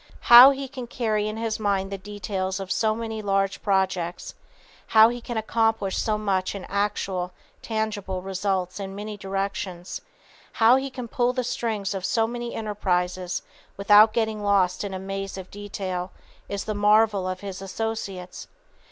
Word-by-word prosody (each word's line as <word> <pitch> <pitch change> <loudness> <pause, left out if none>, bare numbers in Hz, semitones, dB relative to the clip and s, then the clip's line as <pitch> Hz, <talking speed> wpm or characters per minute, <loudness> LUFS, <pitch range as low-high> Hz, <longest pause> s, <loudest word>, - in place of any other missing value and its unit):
How 245 +3 +13
he 275 0 -2
can 255 -2 -7
carry 215 -3 -1
in 215 +1 -4
his 225 -1 -2
mind 200 -2 0
the 195 - -3
details 190 -1 -4
of 190 -1 -6
so 215 -1 +1
many 225 -1 -4
large 195 -1 0
projects, 190 -3 -1 0.5
how 220 0 +7
he 245 0 -5
can 235 0 -5
accomplish 225 -3 0
so 215 -1 0
much 195 -2 -1
in 195 - -6
actual, 195 -3 -2 0.3
tangible 210 -4 -3
results 190 -1 -2
in 195 -1 -6
many 210 +1 -6
directions, 195 -2 -4 0.5
how 230 +2 +6
he 270 +1 -1
can 255 -2 -7
pull 245 0 +1
the 255 0 -1
strings 220 -4 -2
of 190 -2 -4
so 225 +3 +2
many 240 +1 -5
enterprises 180 -4 -1 0.3
without 210 +2 +6
getting 220 -1 -1
lost 200 -3 +2
in 200 - -4
the - - -3
maze 195 +1 -5
of 185 -1 -9
detail, 190 -3 -5 0.4
is 200 -1 -3
the 215 - -3
marvel 205 -2 +3
of 185 0 -5
his 195 -1 -6
associates. 195 -3 -5
205 Hz, 160 wpm, -25 LUFS, 190-220 Hz, 0.5 s, How